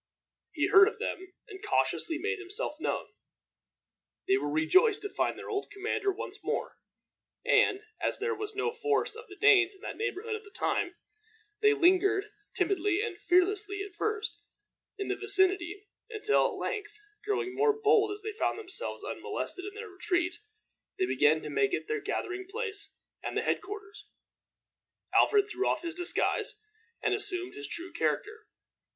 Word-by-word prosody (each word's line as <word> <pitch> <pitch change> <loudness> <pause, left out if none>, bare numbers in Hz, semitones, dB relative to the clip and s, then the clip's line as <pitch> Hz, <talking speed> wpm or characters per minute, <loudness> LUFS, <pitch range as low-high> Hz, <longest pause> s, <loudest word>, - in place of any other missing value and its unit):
He - - +1
heard 395 0 +8
of 450 - -2
them, 375 0 -4 0.2
and 400 -1 -10
cautiously 335 -5 +1
made 425 +4 -2
himself 380 -4 -2
known. - - -2 1.2
They 130 - +5
were 145 +2 -1
rejoiced 370 - +4
to 410 - -3
find - - 0
their - - -8
old 405 -1 -2
commander 410 0 -1
once 390 - -7
more, - - -2 0.7
and, 405 -1 +4 0.2
as - - -1
there 455 +2 -1
was 425 -1 -5
no 415 +3 0
force 440 -1 0
of 455 0 -10
the 390 - -11
Danes 400 -2 +5
in 385 - -20
that - - -6
neighborhood 445 -1 -2
at 435 - -3
the 410 - -14
time, 355 -3 -1 0.7
they 425 0 +5
lingered, 395 +2 +3 0.2
timidly 385 +1 +1
and 440 -6 -4
fearlessly 395 +3 +2
at 400 -2 -9
first, 435 +3 -2 0.6
in 400 - -3
the 385 - 0
vicinity, 390 -1 +1 0.2
until, 430 -1 +2
at - - -5
length, 420 0 -4 0.3
growing 400 -3 -1
more 430 +3 +4
bold 425 0 +3
as 410 0 -7
they 435 - -3
found 435 - 0
themselves 435 +3 -5
unmolested 370 - -4
in 405 0 -7
their 445 +1 -6
retreat, 360 -2 -1 0.6
they 375 - +2
began 155 - +3
to - - -5
make 410 -1 +2
it - - -5
their 440 -1 -1
gathering 375 -2 -3
place 420 -2 -4 0.3
and - - -3
head - - +1
quarters. 415 0 -9 1.1
Alfred 410 -1 +5
threw 395 -2 -1
off - - 0
his 335 -1 -2
disguise, 355 +4 -1 0.4
and 425 - +2
assumed 370 -3 0
his 420 0 -6
true 350 +2 -7
character. 435 +1 -1
405 Hz, 165 wpm, -30 LUFS, 370-425 Hz, 1.2 s, heard